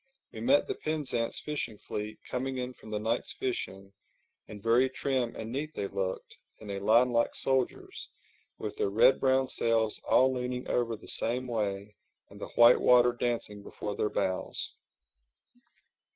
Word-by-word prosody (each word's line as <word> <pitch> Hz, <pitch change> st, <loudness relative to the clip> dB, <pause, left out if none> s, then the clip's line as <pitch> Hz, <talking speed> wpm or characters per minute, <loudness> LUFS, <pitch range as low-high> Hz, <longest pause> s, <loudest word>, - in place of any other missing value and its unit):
We -, -, -8 dB
met 270 Hz, +4 st, +4 dB
the 405 Hz, -, -1 dB
Penzance 145 Hz, -, -2 dB
fishing 140 Hz, -7 st, -3 dB
fleet 105 Hz, +1 st, -5 dB
coming 130 Hz, +1 st, -3 dB
in 125 Hz, 0 st, -4 dB
from 110 Hz, -, -14 dB
the 105 Hz, -, -2 dB
night's 110 Hz, +3 st, -2 dB
fishing, 95 Hz, -6 st, -4 dB, 0.5 s
and 105 Hz, -, -9 dB
very 115 Hz, +5 st, +3 dB
trim 130 Hz, -2 st, -1 dB
and 110 Hz, 0 st, -6 dB
neat 150 Hz, +4 st, -4 dB
they 100 Hz, -, -2 dB
looked, 95 Hz, -1 st, -4 dB, 0.2 s
in 105 Hz, -2 st, -8 dB
a 100 Hz, -, -3 dB
line 115 Hz, +5 st, +4 dB
like 115 Hz, 0 st, +1 dB
soldiers, 135 Hz, -, -1 dB, 0.5 s
with -, -, -5 dB
their 425 Hz, -2 st, +1 dB
red -, -, +5 dB
brown 130 Hz, 0 st, +3 dB
sails 115 Hz, -3 st, 0 dB
all 130 Hz, +1 st, +5 dB
leaning 125 Hz, 0 st, -3 dB
over 115 Hz, -2 st, 0 dB
the 110 Hz, -, -14 dB
same 125 Hz, +3 st, -1 dB
way 105 Hz, -4 st, -3 dB, 0.4 s
and -, -, -13 dB
the -, -, -5 dB
white 120 Hz, +1 st, +7 dB
water 125 Hz, 0 st, +6 dB
dancing 120 Hz, -4 st, -2 dB
before 105 Hz, 0 st, -6 dB
their 105 Hz, -, 0 dB
bows. 95 Hz, -2 st, -2 dB
120 Hz, 160 wpm, -30 LUFS, 105-130 Hz, 0.5 s, white